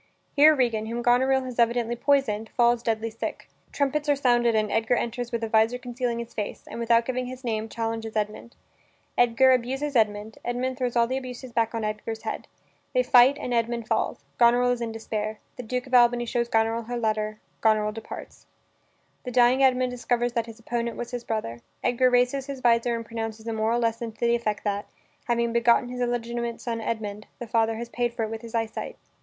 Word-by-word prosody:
Here 305 +2 +7
Regan, 230 -5 0
whom 235 +1 -3
Goneril 260 +2 +3
has 250 -2 -7
evidently 235 0 +2
poisoned, 240 -5 +1
falls 240 -1 +4
deadly 225 -1 -1
sick. 225 - -5 0.2
Trumpets 295 +1 0
are 290 - +5
sounded 240 -4 +3
and 215 -1 +1
Edgar 225 +2 +2
enters 240 +1 -3
with 235 -1 -2
a - - 0
vizor 220 +2 +3
concealing 245 -1 -3
his 235 0 -6
face, 210 -1 -4
and, - - -8
without 230 0 +3
giving 255 0 -2
his 255 +1 -8
name, 220 -2 -2
challenges 225 -1 -4
Edmund. 215 +2 -3 0.6
Edgar 245 +2 +5
abuses 265 +3 0
Edmund; 215 -1 +1
Edmund 255 +2 -2
throws 245 -2 -1
all 235 -1 +4
the 260 +3 -2
abuses 255 -1 -7
back 230 0 +1
on 225 - -2
Edgar's 215 +1 -4
head. - - -4 0.5
They 250 - +4
fight 250 +3 +6
and 250 - -4
Edmund 235 0 -1
falls. - - -1 0.2
Goneril 245 +1 +5
is 245 -1 -2
in 230 -1 -2
despair. 215 -1 -4 0.2
The - - -6
Duke 250 +2 -3
of 260 - -13
Albany 240 -1 +5
shows 235 0 -1
Goneril 225 0 +1
her 245 +1 -4
letter. 215 -2 -1 0.2
Goneril 215 -1 +3
departs. 220 +1 -9 0.8
The 250 - -5
dying 250 +2 +4
Edmund 255 -1 +3
discovers 240 -1 -1
that 230 -1 -1
his 230 0 -11
opponent 235 0 -3
was 240 0 -5
his 245 -1 -4
brother. 215 - -3 0.2
Edgar 250 +1 +3
raises 250 +2 +2
his 275 -1 -5
vizor 235 0 +3
and 230 0 -5
pronounces 225 0 -5
a 230 - -1
moral 220 +2 +1
lesson 230 0 -1
to 215 - -27
the 235 - +3
effect 220 -3 -1
that, 205 -1 -2 0.4
having 235 -1 0
begotten 235 +1 +3
his 250 0 -5
illegitimate 235 -1 -2
son 230 -2 -3
Edmund, 215 -2 -4
the 240 - -6
father 225 0 +1
has 235 +1 -5
paid 240 -1 -2
for 225 - -1
it 220 - -3
with 225 0 -5
his 230 0 -8
eyesight. 225 -1 -3
235 Hz, 200 wpm, -26 LUFS, 225-245 Hz, 0.8 s, Here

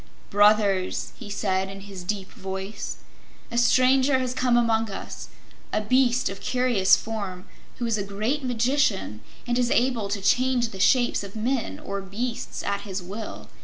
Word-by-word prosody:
"Brothers," 205 -2 +3
he 230 -5 -8
said 190 -2 -1
in 195 0 -8
his 195 -2 -9
deep 195 +1 -3
voice, 190 +2 -5 0.5
"a 235 - -2
stranger 260 +2 +4
has 255 -1 -1
come 250 -1 +2
among 225 -2 +2
us, 195 - -7 0.4
a - - +1
beast 250 +3 +2
of 195 0 -5
curious 245 -7 +3
form 200 -4 -5 0.3
who 240 - -3
is 225 -2 0
a - - -1
great 215 +9 -2
magician 245 - +1 0.2
and 245 0 0
is 245 -1 +2
able 240 -5 +1
to 200 0 -1
change 245 +4 +2
the 195 - -9
shapes 240 +3 +3
of 200 +1 -9
men 230 +2 -1
or 200 0 -5
beasts 230 +6 -4
at 200 0 -1
his 190 -2 -5
will. 205 +5 -7
215 Hz, 165 wpm, -25 LUFS, 195-250 Hz, 0.5 s, stranger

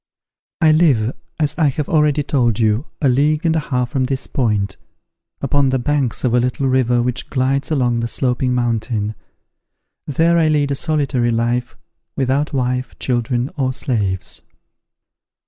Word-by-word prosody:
I 160 -1 +6
live, 140 -8 +3 0.2
as 150 -2 0
I 155 - +4
have 140 +1 -2
already 150 -2 +2
told 120 -7 +1
you, 110 +5 +1 0.2
a - - +5
league 150 +6 +2
and 165 -1 +2
a - - +2
half 125 -4 -2
from 130 -2 0
this 135 +1 -2
point, 105 -6 -1 0.7
upon 140 0 +2
the 130 - +1
banks 135 0 -1
of 125 -2 +1
a 125 - +4
little 125 +2 -1
river 125 -2 +2
which 125 0 -3
glides 135 +1 0
along 125 -6 +1
the 115 - -1
Sloping 125 +1 0
Mountain: 115 -3 -1 0.9
there 165 +4 +2
I 160 - +3
lead 145 -2 +1
a - - +1
solitary 140 -5 0
life, 120 +1 -1 0.4
without 135 +3 0
wife, 125 -2 -2
children, 120 +1 -1
or 130 -2 0
slaves. 105 -9 -3
130 Hz, 155 wpm, -19 LUFS, 120-145 Hz, 0.9 s, I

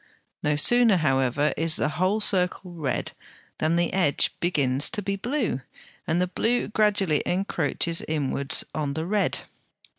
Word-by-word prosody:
No 150 0 +1
sooner, 230 +6 +5
however, 135 -1 +1
is 160 0 0
the 145 - 0
whole 185 +7 0
circle 180 -2 0
red 150 -7 -3 0.5
than 160 +2 +1
the 170 0 0
edge 175 -7 +2
begins 145 -5 +1
to 210 - -3
be 195 +1 -1
blue, 230 - -2 0.5
and 165 +2 +1
the 180 - +2
blue 230 +6 -1
gradually 205 -7 +2
encroaches 175 -2 -1
inwards 140 -2 0
on 145 -2 -3
the 160 +1 -2
red. 205 +2 0
170 Hz, 145 wpm, -25 LUFS, 150-195 Hz, 0.5 s, sooner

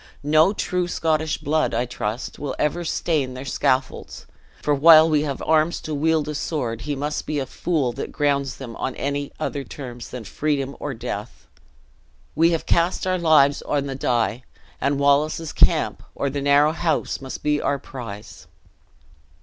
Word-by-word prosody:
No 155 +5 +4
true 180 -3 -1
Scottish 155 -2 0
blood, 155 +2 0
I 120 +2 +1
trust, 115 0 -4
will 140 -2 -4
ever 170 +4 0
stain 150 -6 -1
their 130 +2 -7
scaffolds; 130 -1 -1 0.4
for 150 - +2
while 160 +2 +8
we 155 -2 +2
have 145 -3 -3
arms 160 +1 +2
to 155 - -5
wield 155 +1 +1
a 150 - -3
sword, 125 -7 -3
he 145 +3 -3
must 145 +2 -3
be 155 - -1
a 135 - -1
fool 145 -2 -1
that - - -5
grounds 140 -2 0
them 120 -4 -8
on 130 - -3
any 140 0 -3
other 145 -2 -3
terms 125 -2 -8
than 125 -2 -7
freedom 140 +4 -2
or 145 -3 -4
death. - - -6 0.9
We 165 +1 +4
have 165 -2 -1
cast 170 +3 +1
our 185 -1 0
lives 150 -4 +4
on 145 -1 -1
the 135 - -4
die; 120 -3 0 0.4
and 140 +1 +1
Wallace's 145 +3 +2
camp - - +3
or 140 - -1
the 140 +1 -3
narrow 145 +2 +4
house 165 -4 -1
must 135 -1 -7
be 150 0 +1
our 140 - 0
prize!" 115 -7 -9
145 Hz, 170 wpm, -23 LUFS, 135-155 Hz, 0.9 s, while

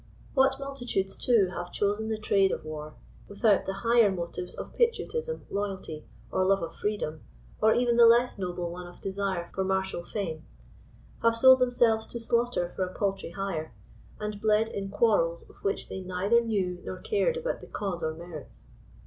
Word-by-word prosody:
What 270 0 +3
multitudes 245 -8 -3
too 220 -7 +3
have 175 0 -5
chosen 205 +2 0
the 220 - -1
trade 195 -2 +3
of - - -4
war, 155 0 -7 0.3
without 200 0 +2
the 195 +1 -4
higher 230 -3 +5
motives 180 0 -5
of - - -6
of - - -21
patriotism, 475 0 0
loyalty, 195 -6 -4 0.2
or 185 - +2
love 195 -1 +3
of 165 0 -5
freedom, 205 -7 -3 0.4
or 220 0 +5
even 240 -1 +2
the 235 -1 +9
less 235 -1 +4
noble 175 -2 -3
one 180 0 -7
of 175 - -14
desire 190 -3 -3
for 190 - 0
martial 190 -2 -1
fame; 175 -5 -4 0.8
have 230 0 +4
sold 260 +2 +8
themselves 240 -3 +3
to 235 - -6
slaughter 235 -6 0
for 190 - 0
a 185 0 -5
paltry 195 -3 -1
hire, 170 -3 -4 0.4
and 210 -1 -4
bled 215 +1 +3
in 195 -1 -4
quarrels 195 -6 +2
of - - -19
which 195 - -2
they - - -5
neither 185 +6 +2
knew 190 -6 -1
nor 185 - -5
cared 460 - 0
about - - -3
the - - -11
cause 195 -4 -4
or 160 -1 -2
merits 165 -3 -10
200 Hz, 180 wpm, -28 LUFS, 180-230 Hz, 0.8 s, the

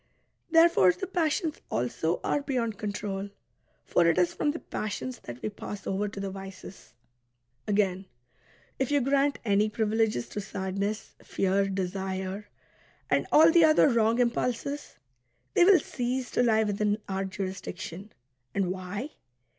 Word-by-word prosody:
Therefore 330 - +6
the 380 - -5
passions 330 -2 -1
also 125 +8 -1
are 290 - +1
beyond 245 -6 -2
control; 200 -1 -3 0.6
for 170 -1 +3
it 165 - +3
is 180 -1 +3
from - - 0
the 300 - -1
passions 235 -1 -5
that 120 0 -7
we - - -1
pass 205 0 -8
over 195 +2 -1
to 200 0 -7
the 195 -1 -3
vices. 195 - -10 0.7
Again, 195 -2 +1 0.7
if 265 - 0
you 290 0 +3
grant 275 +2 +2
any 205 0 +3
privileges 215 - 0
to 205 - -4
sadness, 200 +1 -3
fear, 195 +1 +1
desire, 190 +1 -3 0.6
and - - +2
all 320 +2 +7
the 335 0 +6
other 310 -1 +6
wrong 230 -1 +3
impulses, 250 +4 -1 0.6
they - - +5
will 390 -1 +8
cease 250 +1 -3
to - - +2
lie 220 -2 +4
within 210 0 0
our 195 0 -2
jurisdiction. 190 0 -6 0.4
And 190 -2 +1
why? 190 +9 -5
205 Hz, 140 wpm, -28 LUFS, 190-250 Hz, 0.7 s, will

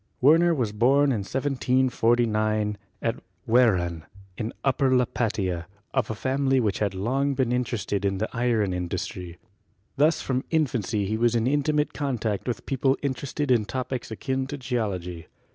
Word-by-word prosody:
Werner 165 +5 +5
was 120 -7 -1
born 135 +6 +3
in 115 - 0
1749 115 -4 +1 0.3
at - - -1 0.3
Wehran, 90 -9 +3 0.3
in 110 +2 -3
Upper 135 -1 +2
Lu 125 - +3
patia, 95 -8 -2 0.3
of 130 -5 0
a 110 - -2
family 135 +2 +1
which 105 -5 0
had 100 -2 0
long 135 +8 0
been 130 -2 +1
interested 120 -5 -1
in 95 -1 0
the 110 +3 -1
iron 115 -5 +1
industry. 90 0 -4 0.6
Thus 150 +3 +4
from 130 0 -1
infancy 120 - 0
he 110 +3 -1
was 120 +1 +2
in 115 -1 +1
intimate 150 +2 +1
con 140 -4 -2
tact 110 -1 -2
with 120 -4 -3
people 135 0 +1
interested 140 +1 -2
in 115 -4 +3
topics 130 +1 -4
akin 130 +4 -2
to 145 +1 -5
Geology. 100 - -3
120 Hz, 155 wpm, -26 LUFS, 105-135 Hz, 0.6 s, Werner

